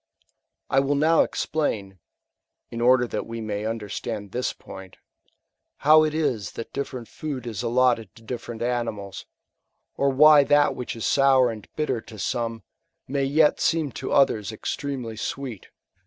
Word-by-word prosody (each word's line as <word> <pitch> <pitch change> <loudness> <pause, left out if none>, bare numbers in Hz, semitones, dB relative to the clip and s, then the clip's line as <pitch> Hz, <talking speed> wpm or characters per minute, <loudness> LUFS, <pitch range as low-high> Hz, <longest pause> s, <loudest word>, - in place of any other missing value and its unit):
I 135 - +3
wiU 140 +1 +1
now 160 +3 +4
explain, 100 - -2 0.7
(in 115 - -5
order 125 +1 +5
that - - -4
we 115 0 -6
may 105 -1 -3
understand 105 -1 -5
this 125 +1 -1
point,) 95 -1 -12 0.8
how 155 +2 +6
it 155 0 -1
is 135 - -1
that 115 - -8
different 130 -4 -5
food 135 0 -6
is 115 -3 -4
allotted 120 -4 +1
to 115 - -16
different 115 0 -6
ant 120 -1 0
mals, 100 -2 -8 0.7
or 140 - +2
why 150 +2 +7
that 145 +1 +3
which 125 -1 -5
is 115 - -4
sour 135 -3 +4
and 110 -2 -9
bitter 135 -7 -1
to 110 - -13
some, 115 +1 -3 0.4
may 140 +1 0
yet 150 +2 +3
seem 160 -4 +1
to - - -6
others 110 -6 +2
extremely 120 0 -4
sweet. 125 -3 -5
125 Hz, 155 wpm, -24 LUFS, 110-140 Hz, 0.8 s, why